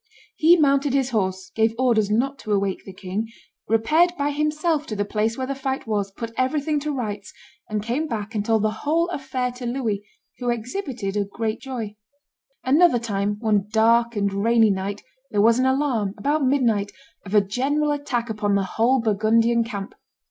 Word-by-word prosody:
He 335 +3 +6
mounted 280 -2 +2
his 265 -2 +1
horse, 190 -4 -1
gave 225 0 +2
orders 235 -5 +2
not 270 +6 0
to 215 - -6
awake 200 -2 0
the 195 - -8
king, 190 +4 -4 0.4
repaired 305 - +3
by 285 -1 0
himself 300 +1 0
to 215 - -4
the 205 0 -1
place 215 +2 -1
where 260 - -2
the 275 - -2
fight 270 0 -3
was, 205 -3 -1
put 230 +3 -7
everything 290 +3 +1
to 300 +1 -3
rights, 210 -7 -4 0.4
and 210 -1 -2
came 255 +8 -1
back 220 -4 -4
and 210 -2 -1
told 220 0 +1
the 215 - +2
whole 330 +4 +1
affair 260 -5 -2
to 245 0 -7
Louis, 230 -5 -2 0.4
who 245 -1 -2
exhibited 240 - -3
great 220 +1 -3
joy. 230 -6 -6 0.7
Another 290 +2 +5
time, 205 -3 -1
one 210 -3 +1
dark 230 +2 +3
and 200 -1 0
rainy 225 +2 +3
night, 195 +1 -3 0.3
there 210 - -1
was 230 +3 +5
an 260 - +3
alarm, 260 -7 0
about 290 +7 0
midnight, 235 -7 +2 0.3
of 200 +1 -4
a - - +8
general 275 +9 0
attack 270 -5 -2
upon 210 -2 0
the 200 - +2
whole 235 +7 +2
Burgundian 225 +2 +2
camp. 200 -4 -6
230 Hz, 180 wpm, -23 LUFS, 210-270 Hz, 0.7 s, a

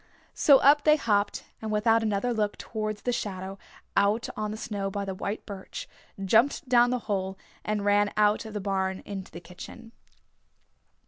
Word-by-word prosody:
So 280 -2 +6
up 285 +2 +5
they 305 0 +6
hopped, 205 -8 0 0.2
and 220 -1 -4
without 225 +2 +3
another 220 +2 0
look 210 -2 -1
towards 215 -2 -4
the 245 - 0
shadow 195 -4 -4 0.4
out 220 +6 +2
on 215 0 -2
the 215 - -5
snow 200 -3 -3
by 200 0 -3
the 195 - -3
white 200 +3 -4
birch, 195 -2 -7 0.4
jumped 235 +9 +3
down 245 -1 +5
the 250 - +1
hole, 190 -2 -2 0.3
and 210 -1 -2
ran 205 0 +3
out 210 0 +3
of 220 -1 -8
the - - -1
barn 190 -1 -1
into 195 -2 -7
the 170 - -8
kitchen. 180 +6 -11
210 Hz, 175 wpm, -27 LUFS, 195-225 Hz, 0.4 s, So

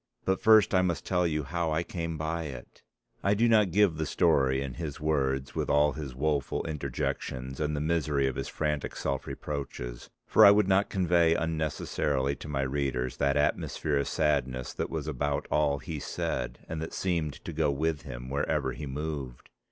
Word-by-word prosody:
But 95 0 +1
first 110 -2 +6
I 90 - +5
must 85 -5 -1
tell 90 -2 +2
you 75 -2 -1
how 85 +3 -2
I 80 +2 +1
came 85 -2 -4
by 80 +1 -2
it." 70 -4 -9 0.4
I 100 +1 +3
do 115 +3 +3
not 110 -4 +5
give 95 -2 +3
the 80 -1 -1
story 70 -7 +3
in 70 -2 -4
his 75 -4 -5
words 70 -3 0
with - - -2
all 75 +1 +4
his 70 -3 -6
woeful 70 0 -1
interjections 65 -2 -3
and 75 0 0
the 75 - -2
misery 75 -3 +1
of 65 -1 -1
his 70 - -3
frantic 75 -2 -2
self 70 -1 -2
reproaches 65 -4 -5 0.2
for 110 - +5
I 100 - +11
would 100 -1 +5
not 95 +1 +3
convey 85 -3 +3
unnecessarily 75 -3 -1
to - - -9
my 70 -2 -1
readers 65 -2 -1
that 70 0 +2
atmosphere 75 0 0
of 70 - 0
sadness 65 -4 0
that - - -3
was - - -3
about 70 0 -2
all 75 -2 +2
he 75 +3 -6
said - - -3
and 80 -1 -4
that 80 - -5
seemed 85 -6 -1
to 85 - -5
go 75 -1 +1
with 75 +1 0
him 65 -3 -8
where 70 +2 -1
ever - - 0
he 75 - -6
moved. 70 -3 -5
75 Hz, 190 wpm, -29 LUFS, 70-80 Hz, 0.4 s, I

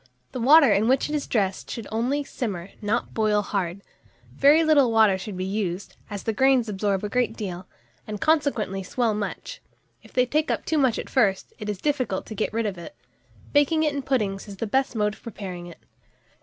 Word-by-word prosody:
The 255 - -5
water 280 -2 +7
in 205 +3 +2
which 265 +3 +2
it - - -4
is 295 -2 -2
dressed 195 -5 -1
should 230 - -5
only 250 +6 0
simmer, 195 -9 -5
and - - -26
not 215 +3 -1
boil 215 -2 +2
hard. 195 -1 -3 0.5
Very 295 - +5
little 290 -6 +4
water 220 -3 +5
should 190 0 -6
be 185 - -2
used, 195 -2 -3
as 205 -2 -6
the 225 - -1
grains 265 0 +3
absorb 200 -1 -1
a - - -1
great 250 +3 0
deal, 185 -4 -5 0.4
and, 210 -1 -5
consequently, 280 -11 +1
swell 225 +4 0
much; 210 - -5 0.4
and - - -17
if - - -23
they 250 - +3
take 305 +5 0
up - - -1
too 315 - +1
much 260 -5 +2
at - - -5
first, 205 -8 +1
it 210 - -5
is 205 - -2
difficult 255 -6 -1
to - - -8
get 215 - -2
rid 225 +1 -1
of 195 -4 -3
it. 230 - -10 0.6
Baking 300 +2 +3
it 300 -2 +1
in 280 - -2
puddings 215 -8 -1
is 200 -1 -9
the 225 - -2
best 265 +4 0
mode 210 -1 +1
of - - -16
preparing 185 -6 -7
it. 170 - -11
220 Hz, 215 wpm, -25 LUFS, 200-265 Hz, 0.6 s, water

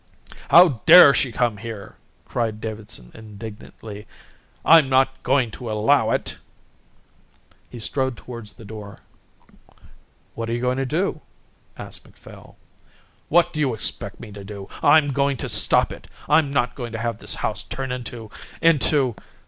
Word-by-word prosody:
"How 165 -10 +6
dare 170 -4 +10
she 130 - 0
come 115 -1 -1
here!" 105 -3 -9 0.3
cried 110 -3 -3
Davidson 110 - -7
indignantly. 105 -1 -11 0.6
"I'm 160 -4 +6
not 130 0 +2
going 130 -3 +1
to 120 +1 -8
allow 105 +1 +2
it." - - -3 1.3
He 125 - -10
strode 130 +2 -2
towards 115 -4 -9
the 115 - -14
door. 105 -1 -10 1.3
"What 115 0 -5
are - - -1
you 120 - -2
going 125 +1 -1
to 135 -1 -2
do?" 160 +1 -2 0.6
asked - - -9
Macphail. - - -16 0.7
"What 170 +2 +3
do 155 - -4
you 135 -6 0
expect 100 -2 -4
me 110 -3 -10
to 100 0 -10
do? 100 -1 -9
I'm 145 -1 +4
going 140 0 0
to - - -5
stop - - +3
it. - - -13 0.2
I'm 150 -4 +3
not 125 -3 0
going 120 -3 -7
to - - -3
have 115 +1 -3
this - - -2
house - - -3
turned 135 -1 -6
into 120 -3 -7 0.3
into...." 145 -6 +3
120 Hz, 150 wpm, -22 LUFS, 110-140 Hz, 1.3 s, dare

